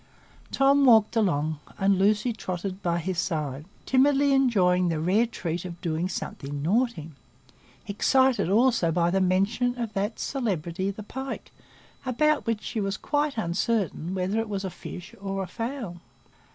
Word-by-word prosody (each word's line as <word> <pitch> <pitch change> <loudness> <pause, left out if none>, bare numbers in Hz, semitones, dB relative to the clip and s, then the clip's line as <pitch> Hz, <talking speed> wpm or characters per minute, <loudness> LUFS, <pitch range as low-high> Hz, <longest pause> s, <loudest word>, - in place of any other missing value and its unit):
Tom 275 +1 +4
walked 225 -4 +5
along, 155 -8 +1 0.2
and 195 -1 +2
Lucy 210 +4 +2
trotted 190 -1 -5
by 170 -2 0
his 175 +1 -2
side, 150 -5 -2 0.2
timidly 280 +1 +4
enjoying 185 -9 +3
the 160 -2 -1
rare 195 +9 +2
treat 175 -6 -4
of 175 -2 -8
doing 170 +2 -2
something 145 -5 -5
naughty,—excited 170 - -1
also 225 -5 +3
by 170 +1 +2
the 190 +1 +2
mention 200 +7 +1
of 230 -3 -3
that 205 +2 -2
celebrity, 190 - -2
the 205 +2 -6
pike, 265 +5 -6 0.5
about 295 +3 +1
which 225 -2 -1
she 220 - -3
was 195 +1 -2
quite 290 -2 -1
uncertain 190 -2 -1
whether 190 +4 0
it 225 -1 -3
was 195 -1 -3
a 190 - -4
fish 180 +1 -9
or 195 -1 -3
a - - -6
fowl. 230 -2 -5
195 Hz, 150 wpm, -26 LUFS, 175-235 Hz, 0.5 s, walked